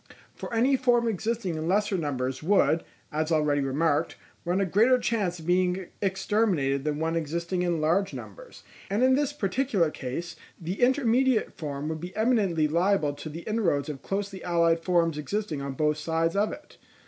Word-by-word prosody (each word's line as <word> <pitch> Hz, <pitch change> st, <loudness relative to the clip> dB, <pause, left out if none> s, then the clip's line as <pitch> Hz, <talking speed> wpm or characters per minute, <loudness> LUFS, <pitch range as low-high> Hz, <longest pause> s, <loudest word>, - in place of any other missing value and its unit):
For -, -, -8 dB
any 245 Hz, +4 st, +3 dB
form 240 Hz, -2 st, +2 dB
existing 220 Hz, -2 st, -2 dB
in 160 Hz, 0 st, -3 dB
lesser 205 Hz, +2 st, +1 dB
numbers 130 Hz, -6 st, -2 dB
would, 160 Hz, -3 st, +3 dB, 0.3 s
as 155 Hz, +2 st, -1 dB
already 150 Hz, -2 st, +2 dB
remarked, 145 Hz, +3 st, 0 dB, 0.3 s
run 175 Hz, +2 st, +1 dB
a 195 Hz, -, +2 dB
greater 225 Hz, +8 st, +4 dB
chance 210 Hz, -7 st, -1 dB
of 160 Hz, -, -11 dB
being 180 Hz, +1 st, +1 dB
exterminated 190 Hz, -8 st, 0 dB
than 150 Hz, -1 st, -1 dB
one 160 Hz, +1 st, -1 dB
existing 170 Hz, +3 st, -2 dB
in 175 Hz, -2 st, 0 dB
large 180 Hz, +6 st, +1 dB
numbers; -, -, -10 dB, 0.3 s
and 205 Hz, +5 st, +1 dB
in 260 Hz, 0 st, +5 dB
this 285 Hz, +1 st, +1 dB
particular 210 Hz, -, 0 dB
case 145 Hz, +7 st, -5 dB, 0.2 s
the 180 Hz, +6 st, -5 dB
intermediate 255 Hz, -1 st, +2 dB
form 145 Hz, -2 st, -5 dB
would 160 Hz, 0 st, -3 dB
be 180 Hz, +1 st, -7 dB
eminently 205 Hz, -9 st, +2 dB
liable 170 Hz, -1 st, +1 dB
to 155 Hz, -, -8 dB
the 160 Hz, +3 st, -7 dB
inroads 170 Hz, -9 st, 0 dB
of 140 Hz, -3 st, -6 dB
closely 195 Hz, -1 st, -4 dB
allied 170 Hz, -1 st, +2 dB
forms 165 Hz, -4 st, +1 dB
existing 180 Hz, -2 st, -3 dB
on 140 Hz, -1 st, -4 dB
both 150 Hz, +2 st, +1 dB
sides 165 Hz, +2 st, -1 dB
of 205 Hz, +2 st, +1 dB
it. 300 Hz, -, -11 dB
175 Hz, 170 wpm, -27 LUFS, 155-210 Hz, 0.3 s, in